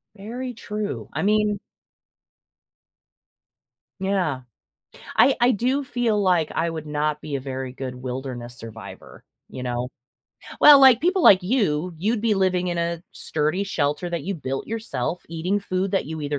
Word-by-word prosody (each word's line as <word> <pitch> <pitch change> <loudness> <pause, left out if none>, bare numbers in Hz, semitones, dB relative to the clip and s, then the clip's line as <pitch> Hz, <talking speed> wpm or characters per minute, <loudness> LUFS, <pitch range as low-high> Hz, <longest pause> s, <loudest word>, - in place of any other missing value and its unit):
Very 245 +5 -6
true. 210 -2 -5
I - - -2
mean 210 -1 +2 2.4
Yeah. 185 -8 0 0.7
I 270 - +5
I 245 +1 +5
do 255 +6 0
feel 235 -5 0
like 180 -5 +2
I 165 +1 0
would 160 -2 -6
not 150 0 -1
be 145 - -4
a - - -1
very 130 -1 -5
good 130 -1 -6
wilderness 125 -1 -6
survivor, 115 -1 -11 0.3
you 125 - -7
know. 125 0 -2 0.7
Well, 290 -1 +10
like, 260 -3 +7
people 365 +2 +2
like 190 -8 +7
you, 180 - 0
you'd 215 +7 0
be 220 -1 +2
living 185 -2 +1
in 175 - -2
a 170 0 -2
sturdy 155 +6 -1
shelter 160 -2 -1
that 170 -1 -3
you 195 +1 -2
built 135 -4 -4
yourself, 180 - -3
eating 170 +5 -1
food 185 -1 -2
that 195 - +1
you 160 +1 -6
either 145 0 -2
180 Hz, 155 wpm, -23 LUFS, 145-210 Hz, 2.4 s, Well